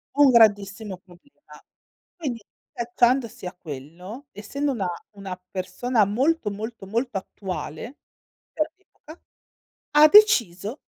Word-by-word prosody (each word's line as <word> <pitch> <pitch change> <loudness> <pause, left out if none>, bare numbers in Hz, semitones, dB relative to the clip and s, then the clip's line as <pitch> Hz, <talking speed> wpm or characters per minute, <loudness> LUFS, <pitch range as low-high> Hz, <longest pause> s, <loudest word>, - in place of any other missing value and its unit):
Un 290 -2 +6
grandissimo 205 -3 +3
problema. 180 +9 -19 0.6
Quindi 260 - -4 0.3
allacciandosi 240 -2 0
a 180 - -5
quello, 180 - -9
essendo 275 +8 -3
una 200 -7 -2 0.2
una 195 -3 -8
persona 205 +5 0
molto, 255 +4 +1
molto, 220 0 -7
molto, 230 0 -1
attuale, 190 - -6 0.5
per 310 0 -1
l'epoca, 350 -4 -17 0.7
ha 300 +1 +8
deciso 235 - +4
220 Hz, 105 wpm, -24 LUFS, 190-270 Hz, 0.7 s, ha